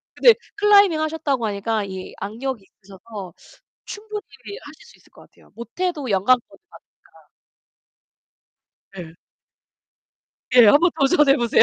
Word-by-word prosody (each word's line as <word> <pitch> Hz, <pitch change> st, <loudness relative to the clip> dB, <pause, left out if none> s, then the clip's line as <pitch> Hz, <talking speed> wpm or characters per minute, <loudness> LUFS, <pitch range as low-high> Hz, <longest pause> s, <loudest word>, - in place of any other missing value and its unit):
근데 475 Hz, -, +6 dB, 0.2 s
클라이밍 405 Hz, -5 st, +4 dB
하셨다고 305 Hz, -6 st, -2 dB
하니까 210 Hz, +1 st, -2 dB
이 190 Hz, -1 st, -9 dB
악력이 225 Hz, +3 st, -5 dB
있으셔서 195 Hz, -1 st, -12 dB, 0.5 s
충분히 420 Hz, 0 st, -8 dB, 0.4 s
하실 -, -, -15 dB
수 480 Hz, -, -19 dB
있을 -, -, -26 dB
것 -, -, -18 dB
같아요. -, -, -25 dB
못 235 Hz, 0 st, -10 dB
해도 330 Hz, -9 st, -2 dB
연간권 230 Hz, +6 st, +1 dB
받으니까 -, -, -20 dB, 2.0 s
네. 170 Hz, -4 st, -9 dB, 1.4 s
예, 240 Hz, -3 st, +7 dB
한번 335 Hz, +11 st, +5 dB
도전해 275 Hz, -1 st, +3 dB
보세요. 235 Hz, -1 st, +3 dB
255 Hz, 275 characters per minute, -21 LUFS, 205-335 Hz, 2.0 s, 예